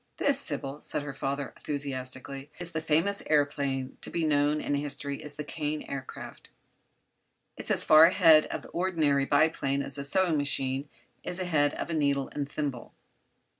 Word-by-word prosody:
"This, 280 -1 +2
Sybil," 145 - -2
said 145 - -3
her 145 -1 -6
father, 140 +1 -3
enthusiastically, 135 -1 -4
"is 175 -1 -6
the 160 -1 -3
famous 165 +6 +2
aëroplane 140 -3 0
to - - -2
be 165 -1 -1
known 145 0 +2
in 145 - -2
history 140 0 -2
as 150 -1 -9
the 150 - -5
Kane 150 0 -4
Aircraft. 135 -1 -8 1.1
It's - - -5
as - - +3
far 155 +1 +8
ahead 165 -3 +6
of - - -5
the - - -12
ordinary 160 -6 +1
biplane 140 -2 +2
as 140 0 -2
a - - -3
sewing 170 +2 +2
machine 135 0 -1 0.3
is 180 - -3
ahead 155 -6 +1
of - - -4
a - - -1
needle 140 -3 +1
and 145 -1 -3
thimble. 140 -5 -5
145 Hz, 170 wpm, -28 LUFS, 140-155 Hz, 1.1 s, far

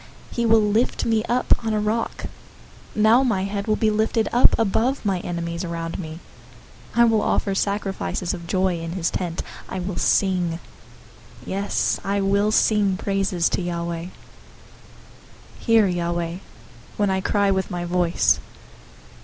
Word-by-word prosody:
He 235 -1 0
will 225 0 +5
lift 210 +4 +1
me 225 -2 +1
up 245 0 +2
on 220 -1 -1
a - - +1
rock. 215 +2 -2 0.7
027:006 215 - 0
Now 225 +4 +6
my 220 -8 +1
head 200 +1 -3
will 215 - +2
be 215 0 +1
lifted 220 +1 +1
up 245 - +5
above 225 +4 0
my 195 -3 +1
enemies 170 -1 -4
around 165 -1 -4
me. 160 -3 -6 0.8
I 235 - +6
will 225 -2 +3
offer 200 - 0
sacrifices 195 -2 -2
of 170 -2 -7
joy 185 -1 0
in 165 0 -5
his 175 -3 -1
tent. 175 -2 -3 0.3
I - - -4
will 185 0 -4
sing, 180 -4 +1 0.9
yes, 200 +1 -1
I 200 +1 0
will 200 +2 +2
sing 205 -3 +3
praises 195 -3 0
to - - -1
Yahweh. 170 -1 -3
027:007 - - -8 1.5
Hear, 225 -2 +4
Yahweh, 170 -1 -2 0.6
when 205 -2 +1
I 190 0 0
cry 200 0 +2
with 190 0 -1
my 175 -2 -4
voice. 175 -1 +2
195 Hz, 155 wpm, -23 LUFS, 175-215 Hz, 1.5 s, Now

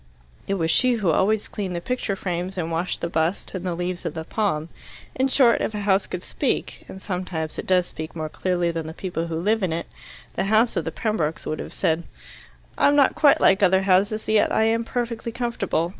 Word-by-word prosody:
It 195 - 0
was 165 -3 +1
she 255 -1 +4
who 205 -8 +1
always 210 +6 +2
cleaned 190 -4 -4
the - - -1
picture 230 0 -2
frames 180 0 -3
and 165 -2 -2
washed 170 +2 -1
the - - -1
bust 165 +2 -1
and 185 -2 -4
the 180 -2 -2
leaves 180 +1 -3
of - - -4
the 160 - -4
palm. 165 -5 -1 0.4
In 260 +1 +1
short, 260 -3 +4
if 215 - -2
a 210 - -3
house 195 -1 +2
could 180 - -5
speak - - -2
and 190 - -8
sometimes 180 -5 -4
it - - -6
does 185 -1 +3
speak 160 -1 -8
more 155 -1 -3
clearly 175 +1 -1
than 165 -1 -4
the 160 - -7
people 175 -3 -3
who 165 - -4
live 210 +7 +1
in 185 -3 0
it 165 +1 -2 0.5
the - - -1
house 220 +3 +3
of 170 - -1
the 165 - -2
Pembrokes 170 -8 -2
would 155 - -3
have - - -6
said, 160 +1 0 0.7
"I - - +5
am 285 - +4
not 280 -2 +5
quite 290 -2 +5
like 195 +2 +4
other 190 0 +4
houses, 200 +3 +2
yet 215 -1 +3
I - - +3
am 225 +1 +2
perfectly 235 -1 -3
comfortable. 235 -8 -1
185 Hz, 225 wpm, -24 LUFS, 170-215 Hz, 0.7 s, I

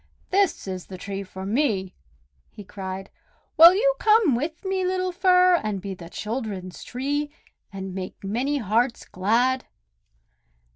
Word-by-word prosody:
"This 390 - +1
is 185 -2 -5
the 185 - -8
tree 195 +1 -5
for 190 0 -8
me!" 205 -5 0 0.6
he 205 - -11
cried. 190 -1 -7 0.4
"Will 335 +3 +9
you - - +3
come 430 - +4
with 315 - -4
me, 380 0 0
little 370 0 0
Fir, 365 0 +4
and 210 -2 -2
be 195 +1 -5
the 170 -2 -11
children's 210 -4 -5
tree, 285 +4 -2 0.4
and 190 -1 -6
make 185 +1 -7
many 250 +9 -1
hearts 235 +1 0
glad?" 240 +7 +1
235 Hz, 140 wpm, -24 LUFS, -, 0.6 s, Will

